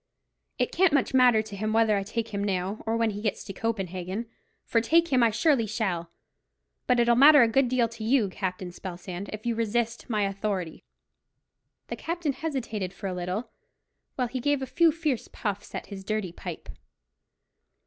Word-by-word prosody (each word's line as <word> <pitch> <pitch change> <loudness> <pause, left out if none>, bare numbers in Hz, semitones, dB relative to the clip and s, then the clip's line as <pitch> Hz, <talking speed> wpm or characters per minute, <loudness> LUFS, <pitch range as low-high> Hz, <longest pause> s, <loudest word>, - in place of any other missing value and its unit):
It - - 0
can't 370 -2 +3
much 275 -1 +2
matter 250 -4 +5
to 210 -2 -9
him 215 +2 -2
whether 225 -1 +4
I 200 - 0
take 225 +3 -3
him 200 -1 -3
now, 195 +1 -2
or 225 +1 +1
when 230 -1 +1
he 205 0 -6
gets 215 -2 -2
to 195 - -7
Copenhagen; 190 -1 -3 0.4
for 230 - +2
take 335 +8 +3
him 260 -3 +3
I 235 - +5
surely 230 +1 +2
shall; 190 -6 -2 0.8
but 250 -1 +3
it'll 235 0 +4
matter 285 +1 +8
a - - +4
good 250 +3 +2
deal 245 -2 +2
to 230 -1 -9
you, 230 -1 +3
Captain 185 -1 -4
Spelsand, 180 +1 -7
if 215 +1 -7
you 235 - +1
resist 230 +2 -1
my 215 -3 +1
authority." 195 -4 -3 1.1
The - - -3
captain 335 -4 -2
hesitated 230 - -3
for 200 - -9
a 190 - -1
little, 180 +6 -4 0.6
while 250 -2 0
he 255 +2 -4
gave 285 +1 +1
a - - -1
few 335 +4 +4
fierce 305 -6 -2
puffs 205 -1 -5
at - - -4
his 195 -2 -8
dirty 215 -3 -2
pipe. - - -8
220 Hz, 185 wpm, -27 LUFS, 195-250 Hz, 1.1 s, matter